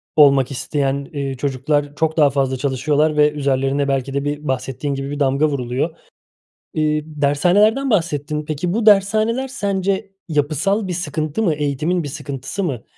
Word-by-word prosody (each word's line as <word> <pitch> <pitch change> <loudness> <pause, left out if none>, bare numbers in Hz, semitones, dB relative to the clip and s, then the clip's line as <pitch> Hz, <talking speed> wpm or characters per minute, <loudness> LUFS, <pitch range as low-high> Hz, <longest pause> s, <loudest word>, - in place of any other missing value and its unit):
olmak 140 -3 +5
isteyen, 140 +1 -1
eee, 140 -2 -3
çocuklar 145 +2 -1
çok 160 +1 0
daha 150 -3 +6
fazla 135 -1 0
çalışıyorlar 145 +3 +1
ve 150 0 +5
üzerlerine 140 -1 0
belki 135 0 -1
de 140 0 -1
bir 145 +1 -3
bahsettiğin 130 +2 -2
gibi 135 +1 -4
bir 145 - -4
damga 140 +1 +2
vuruluyor. 135 +3 -2 0.8
Eee, 150 -1 +1
dershanelerden 180 - +2
bahsettin. 150 - 0
Peki 155 +3 -2
bu 220 +2 -1
dershaneler, 215 +5 +3
sence 200 -4 -1 0.2
yapısal 165 +7 0
bir - - -2
sıkıntı 155 +1 -2
mı, 175 -7 +2
eğitimin 150 +4 -1
bir 145 - -5
sıkıntısı 140 +5 -5
mı? 130 - -3
150 Hz, 155 wpm, -20 LUFS, 140-175 Hz, 0.8 s, daha